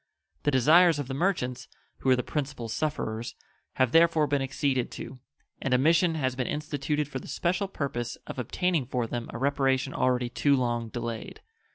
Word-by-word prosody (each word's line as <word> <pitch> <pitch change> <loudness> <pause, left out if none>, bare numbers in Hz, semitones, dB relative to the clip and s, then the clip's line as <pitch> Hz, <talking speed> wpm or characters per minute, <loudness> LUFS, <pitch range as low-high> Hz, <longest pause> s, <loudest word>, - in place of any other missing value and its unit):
The - - +1
desires 155 +5 +5
of 145 -3 -3
the 135 - -4
merchants, 135 -6 -1 0.3
who 135 - 0
were 130 - +6
the 125 - -2
principal 135 -5 -3
sufferers, 115 -3 -3 0.4
have 130 -2 +2
therefore 165 -2 +5
been 145 -1 0
acceded 135 -1 0
to, 130 - -8 0.4
and 135 -2 +2
a - - +5
mission 165 +4 +3
has 130 -4 -1
been 125 -1 -2
instituted 150 0 -2
for 135 -2 -5
the - - -11
special 185 +3 -1
purpose 120 -9 -3
of - - -6
obtaining 165 +1 0
for 125 -2 -1
them 120 +1 -4
a - - -6
reparation 135 0 +1
already 125 -1 +1
too 140 +3 +2
long 120 -3 -1
delayed. 115 -1 -5
135 Hz, 180 wpm, -28 LUFS, 125-150 Hz, 0.4 s, were